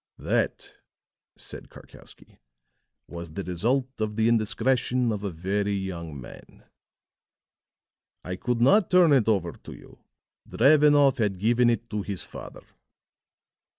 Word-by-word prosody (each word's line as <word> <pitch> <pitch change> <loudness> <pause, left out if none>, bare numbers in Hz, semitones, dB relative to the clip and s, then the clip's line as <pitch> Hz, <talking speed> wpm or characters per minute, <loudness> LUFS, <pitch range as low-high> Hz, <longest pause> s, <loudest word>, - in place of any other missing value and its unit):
"That," - - -2 0.6
said - - -10
Karkowsky, - - -16 0.7
"was 85 -2 -9
the 100 - -5
result 115 +10 -1
of 105 -1 -2
the 110 0 +2
indiscretion 120 +2 +1
of 105 -1 -4
a 100 - -2
very 100 +4 -2
young 85 -6 -6
man. 60 - -14 1.6
I 90 +1 -5
could 120 +4 -2
not 195 - +4
turn 180 -4 +5
it 125 -6 +3
over 95 -6 +1
to - - -12
you. - - -16 0.5
Drevenoff 145 +1 +4
had 105 -4 0
given 120 +5 +2
it 115 0 -1
to 105 -1 -2
his 100 -2 -5
father." - - -11
110 Hz, 125 wpm, -25 LUFS, 95-125 Hz, 1.6 s, turn